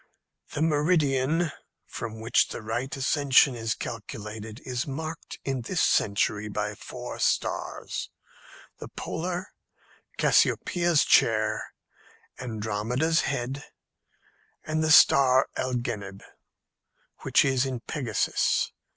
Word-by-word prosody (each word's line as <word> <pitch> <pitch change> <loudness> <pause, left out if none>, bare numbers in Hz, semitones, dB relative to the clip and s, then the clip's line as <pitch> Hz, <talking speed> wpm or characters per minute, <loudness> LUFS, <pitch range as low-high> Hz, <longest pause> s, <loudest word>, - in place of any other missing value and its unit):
"The 150 - 0
meridian, 155 0 +2 0.3
from 110 -1 -6
which 115 +1 +2
the - - -7
right 120 +5 -3
ascension 135 0 +4
is 115 -2 -2
calculated, 110 0 -7
is 130 +4 -3
marked 155 +3 -6
in 135 -2 -1
this 165 +9 -3
century 105 +1 +1
by - - -2
four - - -8
stars - - -2 0.7
the - - -7
Polar, 180 +2 -4 0.7
Cassiopeia's 175 -3 +3
Chair, - - +2 0.6
Andromeda's 120 +7 -1
Head, 135 +1 -3 1.0
and 155 0 -1
the 155 - +1
star 135 -3 +6
Algenib, 120 -6 -3 1.0
which - - +3
is 130 -2 +2
in 130 -3 -4
Pegasus. 125 -7 0
130 Hz, 100 wpm, -27 LUFS, 115-150 Hz, 1.0 s, star